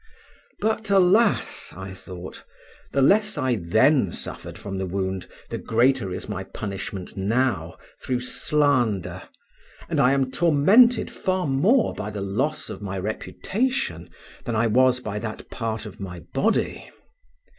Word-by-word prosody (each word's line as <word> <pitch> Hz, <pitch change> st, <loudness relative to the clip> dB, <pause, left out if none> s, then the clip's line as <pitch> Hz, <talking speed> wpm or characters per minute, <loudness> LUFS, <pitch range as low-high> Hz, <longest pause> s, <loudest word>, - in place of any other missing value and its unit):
But 220 Hz, 0 st, -1 dB
alas, 200 Hz, +3 st, +3 dB
I 95 Hz, 0 st, -7 dB
thought, 95 Hz, -1 st, -9 dB, 0.5 s
the 140 Hz, -, +2 dB
less 210 Hz, +7 st, +3 dB
I 130 Hz, -1 st, +1 dB
then 85 Hz, -3 st, +3 dB
suffered -, -, -5 dB
from 95 Hz, -2 st, -5 dB
the 95 Hz, -, -2 dB
wound, 95 Hz, 0 st, -3 dB, 0.2 s
the -, -, -3 dB
greater 120 Hz, -3 st, +2 dB
is 90 Hz, -, -5 dB
my 95 Hz, -2 st, -4 dB
punishment 100 Hz, -1 st, -6 dB
now 100 Hz, -5 st, 0 dB, 0.2 s
through 125 Hz, -1 st, -1 dB
slander, 125 Hz, -, +1 dB, 0.7 s
and -, -, -1 dB
I 125 Hz, +2 st, +5 dB
am 135 Hz, -1 st, +1 dB
tormented 195 Hz, -, +5 dB
far 185 Hz, -1 st, -1 dB
more 180 Hz, -, +3 dB
by 105 Hz, -, -5 dB
the 105 Hz, -1 st, -5 dB
loss 105 Hz, +11 st, -1 dB
of -, -, -7 dB
my 95 Hz, -1 st, -4 dB
reputation 110 Hz, -, -2 dB, 0.4 s
than 120 Hz, -, -2 dB
I 115 Hz, +2 st, +2 dB
was 125 Hz, +3 st, +4 dB
by 105 Hz, -3 st, -4 dB
that 110 Hz, 0 st, -5 dB
of -, -, -24 dB
part 115 Hz, -2 st, -3 dB
of 105 Hz, -, -10 dB
my 90 Hz, -3 st, -7 dB
body. -, -, -1 dB
115 Hz, 145 wpm, -24 LUFS, 95-150 Hz, 0.7 s, I